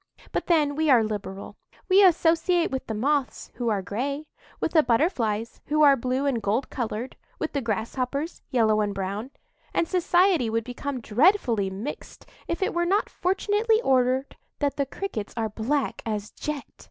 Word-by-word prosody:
But - - -2
then 300 -4 +3
we 315 0 +1
are 245 -4 +6
liberal;—we 215 - -1
associate 340 0 +3
with 265 -1 -4
the 220 - -3
Moths, 275 +4 -1
who 240 -2 -2
are 200 -3 0
gray; 275 +9 -3 0.3
with - - -1
the 320 - +6
Butterflies, 230 - 0
who 305 +1 +3
are 280 -2 +7
blue 255 +2 -1
and 260 -5 0
gold 215 +6 -1
coloured; 235 0 -4 0.2
with - - -3
the 280 - 0
Grasshoppers, 250 - -3
yellow 220 -5 +3
and 205 -1 -1
brown; 200 +5 -3 0.5
and 335 - +2
society 355 - +3
would 225 +1 0
become 250 +2 -5
dreadfully 235 - +3
mixed 205 +10 -7 0.2
if 340 +3 -1
it - - 0
were 345 - +1
not 400 +4 +1
fortunately 420 +4 +1
ordered 260 +1 +2 0.2
that 285 -1 0
the 280 -1 -1
Crickets 250 - -5
are 220 -1 0
black 250 +7 -1
as 210 -2 -4
jet. 300 -2 -4
265 Hz, 165 wpm, -25 LUFS, 220-315 Hz, 0.5 s, are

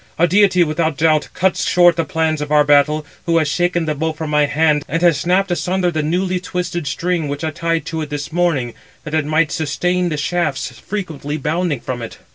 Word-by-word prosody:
a 170 - +4
deity, 185 0 +4
without 160 -1 -1
doubt, 155 0 +2
cuts 185 0 +1
short 175 -1 +5
the 165 - 0
plans 160 0 -1
of 150 0 -4
our 150 -1 +5
battle, 145 +1 +3 0.2
who 165 0 +3
has 155 -2 +2
shaken 175 +2 0
the 155 - -1
bow 160 +2 -1
from 155 -1 -5
my 150 -1 +3
hand, 150 0 +2
and 165 +3 -2
has 170 -4 +4
snapped 185 +3 +1
asunder 180 0 0
the 155 -2 -1
newly 180 +4 0
twisted 175 -3 -4
string 170 -2 -1
which 145 +1 -4
I 160 - -1
tied 165 +1 -2
to 165 -1 -4
it 150 - -5
this 145 +1 -5
morning, 160 -9 0 0.3
that 155 - -8
it 155 -2 +1
might 155 0 +2
sustain 175 +4 -1
the 155 - -3
shafts 155 -3 -1
frequently 155 -8 -5
bounding 155 -1 -1
from 125 -2 -5
it." 115 - -7
160 Hz, 215 wpm, -18 LUFS, 150-175 Hz, 0.3 s, short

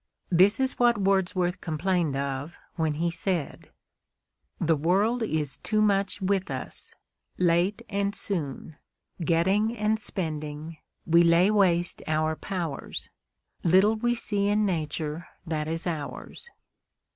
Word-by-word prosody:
This 190 +6 +5
is 265 0 0
what 240 -2 +4
Wordsworth 185 -2 +1
complained 165 -2 0
of 140 +3 -3 0.2
when 160 -3 0
he 170 +2 0
said: 170 -3 -3 0.9
The 165 -1 +2
world 195 +10 +1
is 155 -10 -1
too 215 -1 -1
much 200 -1 +2
with 190 0 0
us; - - -7 0.4
late 180 +3 +2
and 200 -1 -1
soon, 155 -5 -4 0.5
Getting 195 +8 +2
and 215 +1 +1
spending, 155 -4 -4 0.3
we 170 +1 +5
lay 170 +4 +5
waste 175 -4 +2
our 155 0 +1
powers. 170 -6 -5 0.5
Little 190 +6 +5
we 240 +2 0
see 205 -3 -1
in 210 +1 +2
Nature 160 -2 -3 0.2
that 155 -2 -2
is 165 +1 -3
ours. 170 - -5
175 Hz, 120 wpm, -27 LUFS, 160-200 Hz, 0.9 s, This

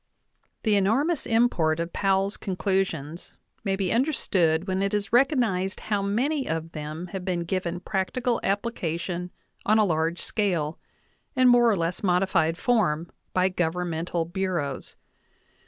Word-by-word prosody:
The 215 -2 +3
enormous 260 - +1
import 200 -9 +2
of 170 +1 -3
Powell's 195 0 +1
conclusions 180 -4 -2 0.3
may 195 -2 0
be 190 -2 -1
under 260 +7 +2
stood 170 - +1
when 190 0 0
it 200 +1 0
is 205 +1 -2
recognized 235 -8 +2
how 205 -2 -1
many 260 +9 0
of 165 0 -3
them 155 +3 -6
have 190 -2 -4
been 180 -2 -1
given 175 0 -2
practical 230 +6 -1
application 180 -4 -2 0.3
on 215 +1 +3
a 215 - +5
large 165 -1 0
scale, 170 -8 -1 0.6
in 255 -1 +5
more 240 -1 +6
or 215 - +3
less 170 +1 -2
modified 180 -3 +2
form, 175 -10 +1 0.2
by 185 0 +3
governmental 175 -1 -1
bureaus. 170 -6 -3
190 Hz, 140 wpm, -26 LUFS, 170-210 Hz, 0.6 s, more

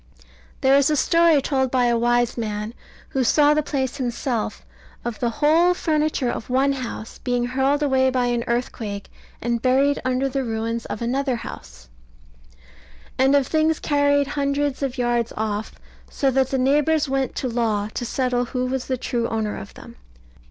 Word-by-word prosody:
There 265 +1 +5
is 280 +1 +4
a 305 - +2
story 335 -1 +4
told 265 -3 +1
by 250 -1 +2
a 240 -1 +3
wise 240 +1 +2
man, 215 -1 -4 0.4
who 265 - 0
saw 295 +4 +4
the 305 - +2
place 275 -2 -2
himself, 245 -2 -3 0.4
of 240 -2 -4
the 240 - +1
whole 320 +8 +3
furniture 305 -6 0
of - - -6
one 265 +2 +2
house 250 -4 -6
being 245 -1 -1
hurled 270 +4 +1
away 265 -2 +3
by 255 -1 +1
an 240 -1 0
earthquake, 225 -4 -3 0.3
and 235 -1 -1
buried 270 +3 +2
under 255 +1 0
the 270 0 -2
ruins 230 0 -3
of 225 - -5
another 260 +2 0
house; 65 - -9 1.3
and 265 +2 +4
of 280 -2 +3
things 315 +1 +1
carried 285 -1 +2
hundreds 280 0 -1
of 270 -1 -2
yards 240 -1 0
off, 215 0 -2 0.4
so 270 -1 0
that 265 0 +2
the 270 - 0
neighbours 295 +3 +2
went 270 -1 -1
to 260 - -2
law 225 -4 0
to - - -3
settle 245 0 0
who 250 0 -2
was 255 0 -3
the 260 - -1
true 240 -1 -2
owner 220 -2 -2
of 100 - -9
them. - - -13
255 Hz, 175 wpm, -22 LUFS, 235-280 Hz, 1.3 s, There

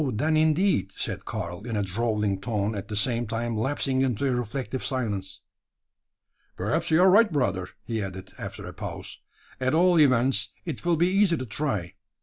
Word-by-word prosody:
then, 155 +8 +1
indeed," 155 - +2
said - - -4
Karl, 85 +2 -4
in 115 -3 -2
a 105 - +1
drawling 105 0 -1
tone, 105 -2 -1
at 100 -1 -5
the 105 - -5
same 120 +2 +1
time 115 +1 -2
lapsing 130 +3 0
into 130 0 +1
a 130 - +1
reflective 125 +1 -3
silence. 100 -7 -3 1.2
"Perhaps - - 0
you 160 - +4
are 190 - +7
right, 210 +1 +6
brother," 100 - 0 0.2
he 115 -1 -2
added, 95 -1 -6
after - - -6
a - - -7
pause. - - -7 0.4
"At 130 +3 +1
all 175 0 +5
events, 125 -5 +3 0.2
it 165 - -5
will 170 -1 +2
be 175 +3 +3
easy 190 -3 +3
to 130 - -4
try. 105 - -2
120 Hz, 175 wpm, -26 LUFS, 105-150 Hz, 1.2 s, are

